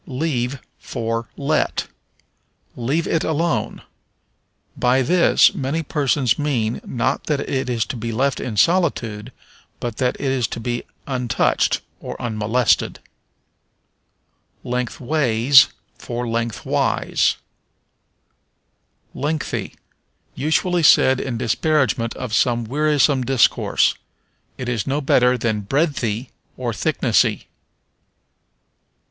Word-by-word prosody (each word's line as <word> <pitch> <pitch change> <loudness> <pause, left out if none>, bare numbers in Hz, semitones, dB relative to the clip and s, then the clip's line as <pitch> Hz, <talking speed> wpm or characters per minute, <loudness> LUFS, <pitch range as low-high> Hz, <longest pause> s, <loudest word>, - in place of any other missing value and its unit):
Leave 135 -2 -2 0.2
for 115 0 -4
Let. 150 +2 0 0.9
"Leave 140 +8 -1
it 165 - 0
alone." 160 +1 -1 0.9
By 125 +2 +2
this 175 +6 +4
many 140 +5 -2
persons 140 -5 +1
mean, 120 -7 -1
not 120 - -2
that 150 -3 0
it 130 -1 -2
is 115 -2 0
to - - -5
be 115 0 -4
left 130 +4 0
in 115 -5 -5
solitude, 125 - +1 0.5
but 120 -3 -4
that 125 -1 0
it 135 -2 -1
is 125 -4 0
to - - -6
be 120 +1 -3 0.2
untouched, 125 -3 0 0.2
or - - -7
unmolested. 110 +1 +1 1.7
Lengthways 125 +1 +3 0.3
for 120 0 -4
Lengthwise. 115 -2 0 1.8
Lengthy. 150 +2 -3 0.6
Usually 160 +5 +1
said 130 -4 +5
in 125 -3 -3
disparagement 130 0 0
of 125 -4 -6
some 120 0 +2
wearisome 145 +1 +2
discourse. 130 -2 +2 0.6
It 130 - -5
is 120 -5 -2
no 140 +2 0
better 125 -3 +3
than 110 -3 -1
breadthy, 130 -2 -1 0.3
or - - -3
thicknessy. - - +1
125 Hz, 100 wpm, -21 LUFS, 115-145 Hz, 1.8 s, said